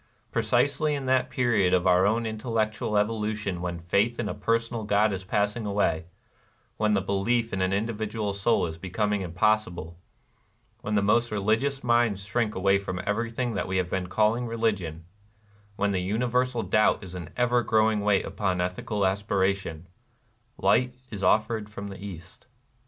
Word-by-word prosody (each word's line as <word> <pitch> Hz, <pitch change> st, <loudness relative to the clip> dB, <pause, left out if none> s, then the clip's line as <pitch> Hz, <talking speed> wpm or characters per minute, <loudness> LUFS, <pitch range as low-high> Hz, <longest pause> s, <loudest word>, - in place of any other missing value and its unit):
Precisely 135 Hz, +7 st, +1 dB
in 140 Hz, -2 st, -4 dB
that 130 Hz, 0 st, +2 dB
period 110 Hz, -8 st, +2 dB
of 90 Hz, 0 st, 0 dB
our 90 Hz, +1 st, +5 dB
own 115 Hz, +2 st, +1 dB
intellectual 110 Hz, -1 st, -1 dB
evolution 105 Hz, -3 st, -1 dB
when 85 Hz, -1 st, -3 dB
faith 100 Hz, +8 st, +1 dB
in 120 Hz, -, -1 dB
a -, -, -2 dB
personal 115 Hz, +2 st, -1 dB
God 105 Hz, 0 st, +2 dB
is 95 Hz, 0 st, -4 dB
passing 105 Hz, +4 st, 0 dB
away, 100 Hz, -5 st, 0 dB, 0.4 s
— -, -, -38 dB
when 105 Hz, -1 st, +2 dB
the 100 Hz, -, +2 dB
belief 115 Hz, +4 st, 0 dB
in 95 Hz, -, -1 dB
an 95 Hz, 0 st, +1 dB
individual 105 Hz, 0 st, -2 dB
soul 100 Hz, +1 st, +2 dB
is 80 Hz, -1 st, -6 dB
be 95 Hz, -, -7 dB
coming 105 Hz, +2 st, 0 dB
impossible, 90 Hz, -2 st, 0 dB, 0.4 s
— -, -, -40 dB
when 105 Hz, -, -2 dB
the 100 Hz, -, +2 dB
most 120 Hz, +4 st, +3 dB
religious 110 Hz, +7 st, 0 dB
minds 120 Hz, -5 st, +2 dB
shrink 105 Hz, +2 st, -1 dB, 0.3 s
from 95 Hz, -2 st, -4 dB
everything 115 Hz, +3 st, -1 dB
that 100 Hz, -, -2 dB
v^^e 95 Hz, 0 st, -1 dB
have 90 Hz, -1 st, -1 dB
been 95 Hz, -1 st, -1 dB
calling 110 Hz, +5 st, +1 dB
religion, 100 Hz, -9 st, -2 dB, 0.3 s
— 105 Hz, -1 st, -32 dB
when 100 Hz, 0 st, 0 dB
the 95 Hz, -2 st, 0 dB
universal 120 Hz, +4 st, 0 dB
doubt 105 Hz, 0 st, +2 dB
is 95 Hz, -2 st, -9 dB
an 90 Hz, -3 st, -7 dB
ever 125 Hz, 0 st, +3 dB
growing 110 Hz, -1 st, +2 dB
weight 100 Hz, -1 st, +2 dB
upon 95 Hz, -3 st, -1 dB
ethical 90 Hz, +3 st, -1 dB
aspiration, 95 Hz, -4 st, -1 dB, 0.4 s
— 120 Hz, 0 st, -41 dB
light 125 Hz, +5 st, +3 dB, 0.2 s
is 100 Hz, -3 st, -6 dB
offered 110 Hz, +2 st, +2 dB
from 100 Hz, -1 st, -7 dB
the 95 Hz, 0 st, -9 dB
East. 90 Hz, 0 st, -10 dB
105 Hz, 170 wpm, -27 LUFS, 95-115 Hz, 0.4 s, our